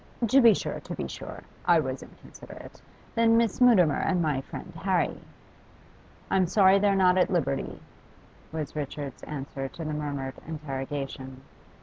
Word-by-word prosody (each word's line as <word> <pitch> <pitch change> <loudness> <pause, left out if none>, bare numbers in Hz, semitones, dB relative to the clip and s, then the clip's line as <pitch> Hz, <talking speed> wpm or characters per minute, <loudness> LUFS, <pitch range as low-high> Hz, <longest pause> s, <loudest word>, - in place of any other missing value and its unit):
'To 270 +5 +5
be 230 -2 +8
sure, - - -2
to - - -7
be - - -4
sure; - - -8 0.2
I 170 -2 +5
was 130 -3 -3
inconsiderate. - - -13 0.3
Then 230 0 +4
Miss 230 0 +1
Mutimer 185 -12 +5
and 180 - +1
my 150 -5 0
friend 175 +5 -9
Harry 185 -3 +1 0.6
' - - -27
'I'm 190 -2 +3
sorry 195 +1 +5
they're 200 -1 +3
not 185 -1 +4
at 180 - +3
liberty,' 160 -7 -1 0.7
was 155 -2 -5
Richard's 145 -1 -5
answer 135 -2 -5
to 165 +4 -8
the 155 - -3
murmured 140 -3 -3
interrogation. 135 -3 -5
160 Hz, 150 wpm, -27 LUFS, 140-190 Hz, 0.7 s, be